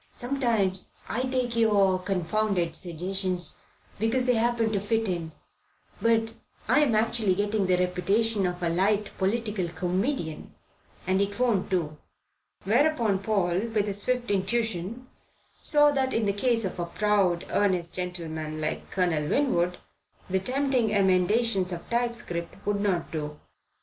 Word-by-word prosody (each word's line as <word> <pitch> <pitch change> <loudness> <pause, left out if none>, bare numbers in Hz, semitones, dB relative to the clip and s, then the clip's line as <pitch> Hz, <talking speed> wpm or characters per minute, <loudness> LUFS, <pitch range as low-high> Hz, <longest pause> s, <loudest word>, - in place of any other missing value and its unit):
Sometimes 235 -8 0
I 240 - -1
take 255 -2 -1
your 200 -5 +3
confounded 185 0 0
suggestions, 180 0 -2 0.4
because 235 +4 +1
they 250 - +3
happen 230 -1 +1
to 200 - +1
fit 220 +2 0
in; 170 -3 -3 0.7
but 225 -1 +2 0.3
I'm 285 -7 +3
actually 215 -3 +2
getting 205 0 0
the 180 -1 +3
reputation 195 +3 +1
of 180 0 -4
a 170 - +2
light 200 +4 +1
political 210 -1 0
comedian, 180 - -2 0.5
and 190 +1 +2
it 200 +2 -2
won't 235 -7 +1
do." 155 -5 -1 0.6
Whereupon 230 -2 +2
Paul, 195 -4 +1
with 215 -3 0
his 205 -1 -3
swift 250 0 -1
intuition, 220 +2 -1 0.6
saw 295 -1 +4
that 265 -2 0
in 225 - +1
the 200 - +1
case 230 +1 +1
of 185 - -4
a 170 - -2
proud, 195 -3 +1
earnest 185 -4 +1
gentleman 160 -4 -4
like 155 0 -3
Colonel 165 -5 0
Winwood 180 -11 +1 0.5
the 190 +1 +1
tempting 255 +1 +1
emendations 195 +1 +3
of 170 -1 -6
typescript 235 -8 -3
would 205 -1 0
not 185 -5 0
do. 150 -2 -5
200 Hz, 135 wpm, -27 LUFS, 180-230 Hz, 0.7 s, saw